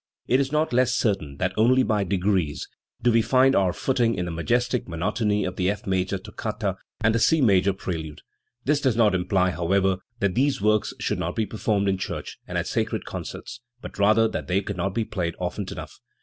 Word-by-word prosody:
It 130 - +3
is 135 0 0
not 155 -2 +1
less 125 0 +3
certain, 95 - -1
that 95 +2 -1
only 125 +4 +4
by 105 -4 +1
degrees 95 -4 0 0.4
do 120 - +4
we 115 0 +4
find 130 +4 +4
our 95 -2 +3
footing 120 +2 +1
in 90 - -2
the 85 - -4
majestic 120 +9 0
monotony 105 +4 0
of 90 0 -4
the 90 0 +1
F 100 -1 -3
major 95 0 0
toccata 95 - -4 0.3
and 115 - +3
the 115 - +2
C 160 +7 +4
major 100 -7 +4
prelude. 80 -6 -5 0.4
This 145 +1 +2
does 130 -5 +2
not 110 -3 +4
imply, 95 0 +1
however, 95 +2 +1 0.2
that 100 -2 +1
these, 135 +6 +1
works 105 +1 +1
should - - -1
not - - -3
be 110 - 0
performed 105 -2 -1
in 95 -1 +1
church - - -5
and - - -3
at - - -1
sacred - - -2
concerts, 120 - -7 0.2
but - - -10
rather 110 +2 +5
that - - -5
they 95 +2 +1
cannot 95 -1 -3
be 115 - 0
played 85 -6 -3
often 90 +2 -3
enough. - - -8
100 Hz, 205 wpm, -25 LUFS, 95-115 Hz, 0.4 s, rather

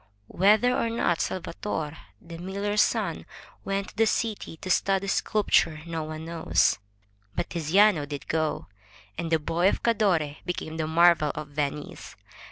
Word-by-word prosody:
Whether 215 +6 +4
or 230 - 0
not 180 -7 0
Salvator, 165 -3 -4 0.2
the 165 0 -10
miller's 200 +3 0
son, 205 -8 -1 0.4
went 195 0 -2
to - - -18
the 225 0 +4
city 215 -8 -2
to 185 - -8
study 195 +1 +2
sculpture, 195 -5 +1
no 165 -1 -3
one 155 +1 -7
knows. 165 -1 +1 0.6
But - - -3
Tiziano 170 0 +3
did 145 -1 -7
go, 155 -2 -1 0.5
and 165 0 -4
the 160 - +5
boy 165 +4 +1
of - - -3
Cadore 180 -10 +1
became 160 -2 -4
the 155 -1 -1
marvel 165 -2 +4
of 150 - -6
Venice. 145 0 -4
170 Hz, 150 wpm, -26 LUFS, 155-200 Hz, 0.6 s, the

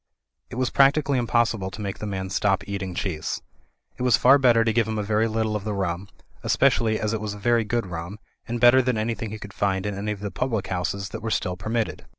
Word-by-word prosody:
It - - -8
was 130 0 0
practically 140 0 +4
impossible 115 -5 +1
to 95 - -10
make 100 -1 -4
the 105 - -4
man 95 -2 -4
stop 95 0 +1
eating 95 -3 -4
cheese. 85 -4 -3 0.6
It - - -7
was 125 -2 +4
far 135 +3 +6
better 120 -3 +5
to 115 -1 +1
give 115 -1 +2
him 110 -1 -2
a 105 - -1
very 110 +2 +1
little 110 -1 -1
of 105 - -3
the 105 -1 -3
rum, 95 0 -2 0.4
espe 140 0 +4
cially 110 -1 0
as 110 0 -1
it 110 - -2
was 105 -1 -4
very 115 +3 +2
good 115 +1 -1
rum, 85 +2 -6 0.3
and 120 +1 -3
better 120 +2 +7
than 125 -2 0
any 110 +2 0
thing 115 -1 -5
he 110 - -6
could 100 -2 -10
find 95 -1 0
in 105 - -2
any 105 +2 -3
of 105 - -5
the 100 -1 -4
public 110 -1 -2
houses 100 +2 -2
that 110 - -7
were 110 - -3
still 90 -4 -1
permitted. 110 +5 -3
110 Hz, 245 wpm, -24 LUFS, 100-115 Hz, 0.6 s, better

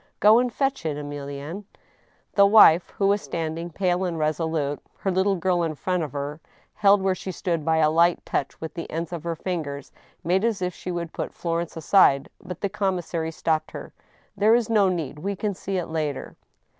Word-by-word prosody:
— - - -49
Go 215 +3 +7
and 250 0 0
fetch 270 -3 -1
it, 155 -3 -2
Emilienne." 145 +5 -6 0.7
The 200 -1 +6
wife, 190 -5 +7
who 200 - -2
was 200 +1 +2
standing, 165 +1 -4
pale 180 +1 0
and 175 -3 -2
resolute, 155 -2 -1 0.2
her 195 - -1
little 190 +2 +2
girl 180 0 +1
in 160 -2 -1
front 180 +5 -1
of 150 -4 -4
her, 145 +2 -5 0.3
held 200 -1 +4
where 190 -1 +2
she 185 +1 -6
stood 170 -3 -2
by 160 +1 +2
a 155 -1 +4
light 170 +2 +3
touch 140 - -3
with 160 - -6
the 170 - -6
ends 165 +2 -4
of 165 -3 -5
her 170 -1 -2
fingers, 150 -5 -4 0.3
made 185 +4 +1
as 230 -3 +1
if 180 -1 -2
she - - -8
would 170 -2 -4
put - - -4
Florence 170 -1 -3
aside, 160 -5 +4
but 180 - -8
the 200 - +1
com 195 -1 -1
missary 165 -2 -3
stopped 160 -1 -1
her. - - -9 0.2
" - - -36
There 215 +3 +5
is 235 -2 0
no 205 -4 +4
need. 160 -5 -3
We 200 +5 -3
can 205 +1 -2
see 195 +1 -4
it 180 - -1
later." 155 -4 -4
170 Hz, 210 wpm, -24 LUFS, 160-195 Hz, 0.7 s, Go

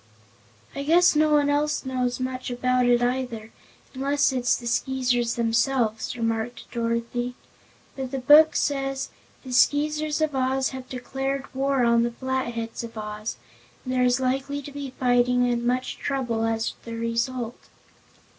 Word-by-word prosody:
"I 280 - -3
guess 335 +4 +4
no 310 +1 +4
one 295 -1 +4
else 290 0 0
knows 255 -1 -1
much 255 0 -3
about 250 0 +1
it 245 0 +4
either, 245 -3 -2 0.4
unless 280 +2 +1
it's 250 -2 +1
the 240 - -10
Skeezers 245 0 0
themselves," 230 0 0
remarked 225 +1 -2
Dorothy. 235 +1 -2 0.6
"But 265 -1 -4
the 270 - -3
Book 295 +4 +7
says: 270 -1 -1 0.3
'The 255 -2 -7
Skeezers 300 +4 +2
of 310 -2 0
Oz 265 0 +1
have 260 -1 -8
declared 270 +2 -4
war 270 -1 +1
on 235 0 +4
the 235 - +1
Flatheads 235 -2 -3
of 230 -1 -9
Oz, 210 0 -5 0.5
and 255 - -2
there 255 - +2
is 250 0 +3
likely 270 +2 -1
to 285 - -8
be 280 -1 -6
fighting 245 0 +3
and 240 -1 0
much 250 +1 -1
trouble 240 -5 -1
as 225 0 -1
the 230 0 -6
result.'" 230 +1 -3
255 Hz, 150 wpm, -25 LUFS, 235-270 Hz, 0.6 s, Book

